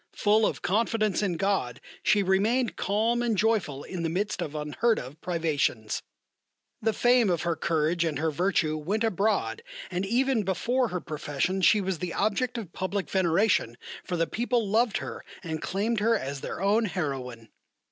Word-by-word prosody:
Full 215 +1 +3
of - - -4
confidence 215 0 +1
in 185 -5 0
God 185 -11 0 0.2
she 205 -1 +3
remained 215 +6 +2
calm 225 +4 +1
and 230 -3 0
joyful 200 -10 +1
in 185 -2 -5
the 165 - -1
midst 200 +5 -2
of 150 - -4
unheard 155 +10 +1
of 135 +5 -8
privations. 155 -10 -1 0.8
The 225 0 +2
fame 240 0 +3
of 175 -2 0
her 170 -1 0
courage 165 +1 +1
and 160 -3 -1
her 160 +1 0
virtue 165 -2 +1
went 200 +9 -1
abroad 200 - 0 0.3
and 180 +1 -1
even 245 +3 +2
before 235 +7 0
her 180 -4 -4
profession 155 +4 -2
she 210 +3 +5
was 190 -3 -2
the 180 -2 -4
object 240 +5 0
of 200 -7 -7
public 190 +1 -3
veneration, 185 - +2 0.3
for 180 - -3
the 165 - +2
people 235 +2 0
loved 225 +2 +2
her - - -6 0.2
and 160 -3 -4
claimed 210 +4 -1
her 225 +2 +3
as 140 -5 -5
their - - -5
own 215 +3 +3
heroine. 135 - -4
190 Hz, 170 wpm, -27 LUFS, 160-220 Hz, 0.8 s, she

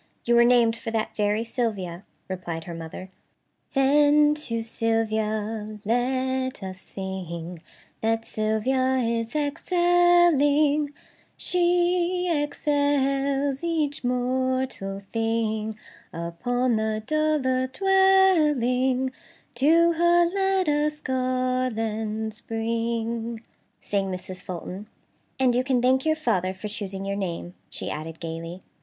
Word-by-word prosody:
You 240 - +2
were 235 0 +7
named 235 -2 +4
for 230 0 -6
that 225 -1 -2
very 210 +1 +1
Sylvia," 205 -7 -3 0.2
replied 175 -3 -5
her 170 - -7
mother. 165 +3 -8 0.6
"'Then 295 +2 +5
to 230 -7 -3
Sylvia 220 -1 -1
let 260 +1 0
us 185 -1 -7
sing, 180 -3 -6 0.4
That 225 0 0
Sylvia 255 +5 0
is 230 0 -1
excelling; 305 -2 +3 0.5
She 355 0 +1
excels 285 -1 0
each 310 -5 -1
mortal 250 -5 -1
thing 220 -1 -1 0.3
Upon 235 +9 -1
the 215 0 -1
dull 310 -1 +1
earth 260 0 0
dwelling; 300 -10 +3 0.4
To 330 +7 +4
her 345 +1 +4
let 385 0 +1
us 300 0 +1
garlands 235 -5 -1
bring'" 230 0 -2 0.4
sang 200 -1 -1
Mrs. 185 0 -6
Fulton; 185 +3 -7 0.5
"and 255 -2 +3
you 250 +1 +2
can 260 -1 +1
thank 260 +4 +2
your 315 - +3
father 190 - 0
for 190 +3 -6
choosing 195 -2 -4
your 200 0 -2
name," 175 -2 -4 0.2
she - - -5
added 160 +1 -6
gaily. 165 +2 -6
245 Hz, 110 wpm, -25 LUFS, 215-290 Hz, 0.6 s, were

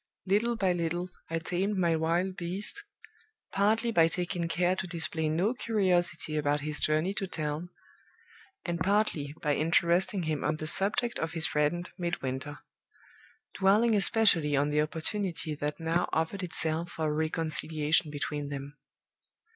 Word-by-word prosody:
Little 215 +5 +2
by 190 -5 +1
little 175 +1 -2 0.2
I 165 - -1
tamed 185 +5 -1
my 170 -3 +2
wild 170 +4 0
beast 190 - -2 0.7
partly 220 +4 +2
by 165 -6 +5
taking 175 0 -1
care 180 +2 +1
to 190 - -3
display 160 -2 -2
no 180 +9 +1
curiosity 175 - 0
about 145 0 +1
his 150 0 -4
journey 155 +5 +1
to 195 -1 -3
town, 155 0 -3 1.0
and 170 -1 -2
partly 180 -7 0
by 150 - +2
interesting 170 +5 +2
him 155 -2 -2
on 150 +1 +1
the 155 - -5
subject 210 +8 +2
of 160 0 -3
his 165 -1 +2
friend 150 +4 0
Midwinter; 145 -4 -3 1.0
dwelling 210 +4 +3
especially 195 -8 +4
on 145 +1 +1
the 150 0 +3
opportunity 165 +1 -2
that 150 +1 -4
now 165 +2 0
offered 160 +5 -1
itself 165 -1 +1
for 160 - -3
a 150 - 0
reconciliation 155 0 0
between 145 0 -4
them. 140 +1 -7
165 Hz, 145 wpm, -29 LUFS, 155-190 Hz, 1.0 s, by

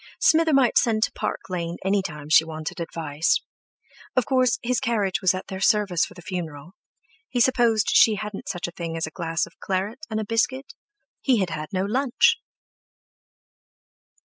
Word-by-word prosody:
Smither 320 0 +4
might 270 -4 +4
send 220 -2 +1
to - - +1
Park - - -3
Lane 170 -2 -3
any 195 +1 +2
time 150 -5 -7
she 160 +1 +6
wanted 155 0 -6
advice. 160 -2 0 0.8
Of 255 - +2
course, 255 -3 +2
his 250 +1 +1
carriage 220 -7 0
was 185 -1 +3
at 185 - -5
their 190 - -6
service 200 -5 +3
for - - -14
the 175 - -12
funeral. 165 -4 -6 0.6
He 245 - -1
supposed 235 -4 +3
she 220 - +6
hadn't 210 -1 -6
such 175 -2 -3
a - - -7
thing 165 -1 -5
as 165 - -1
a 160 - -8
glass 165 0 -2
of - - -19
claret 195 +6 -2
and 220 -1 -2
a 215 - -3
biscuit—he 265 - -2
had 190 -4 0
had 155 -1 -5
no 190 0 0
lunch! 270 - +2
195 Hz, 170 wpm, -24 LUFS, 170-235 Hz, 0.8 s, she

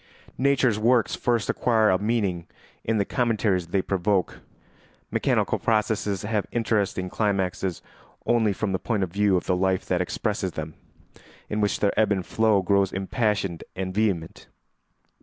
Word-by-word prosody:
Nature's 130 -5 +2
works 120 +1 +3
first 120 -3 0
acquire 110 -4 +2
a 95 - +2
meaning 100 -6 -1 0.4
in 115 0 0
the 100 - +1
commentaries 105 -8 0
they 95 +2 0
provoke; 95 0 0 0.7
mechanical - - +1
processes 105 -3 0
have 105 -1 -1
interesting 105 -5 0
climaxes 95 -3 -1 0.4
only 115 -3 +3
from 100 +1 -2
the 95 - -1
point 105 -5 -1
of 90 -2 -4
view 100 -2 +3
of - - -3
the 90 - +1
life 95 0 0
that 90 -1 0
expresses 95 0 -2
them, 80 0 -5 0.8
in 105 0 0
which 105 - 0
their 100 - +2
ebb 110 -1 +3
and 95 -3 0
flow 110 -3 +2
grows 100 0 +2
impassioned 95 -2 -1
and 95 0 -4
vehement. 95 -6 -1
100 Hz, 150 wpm, -25 LUFS, 95-110 Hz, 0.8 s, works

